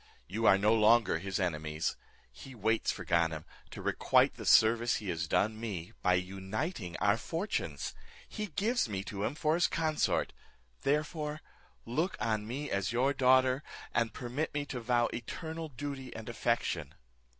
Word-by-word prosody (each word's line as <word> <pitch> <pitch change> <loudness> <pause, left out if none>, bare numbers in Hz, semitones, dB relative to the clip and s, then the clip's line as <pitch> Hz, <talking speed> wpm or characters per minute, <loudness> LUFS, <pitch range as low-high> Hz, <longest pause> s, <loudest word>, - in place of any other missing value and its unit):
You 110 +5 0
are 95 - +7
no 105 +3 +3
longer 110 -5 +4
his 95 +2 -3
enemies. 80 -3 -1 0.4
He 135 -1 -11
waits 110 +1 +1
for - - -7
Ganem, 80 -2 +1 0.2
to - - -8
requite - - +3
the - - -7
service 115 +2 +5
he 105 -3 -4
has 85 -1 -2
done 110 +6 +1
me, 95 -7 -5
by 90 0 +4
uniting 95 - -3
our 100 +1 +3
fortunes; 170 - -3 0.3
he 215 -1 -4
gives 210 - 0
me 95 -2 -3
to 100 0 -5
him 125 - -1
for 155 0 +1
his 175 +2 +3
consort, 155 -2 0 0.5
therefore 150 +1 -1 0.5
look 155 +11 -1
on 110 -1 -1
me 140 +5 -4
as 100 +2 0
your 130 +4 +2
daughter, 130 0 +4 0.3
and 115 -1 +1
permit 125 +6 -3
me 145 -1 -1
to 135 -3 -5
vow 120 0 +2
eternal 160 +7 -5
duty 140 -1 -6
and 110 +1 -7
affection." 115 -10 -1
115 Hz, 160 wpm, -32 LUFS, 100-145 Hz, 0.5 s, are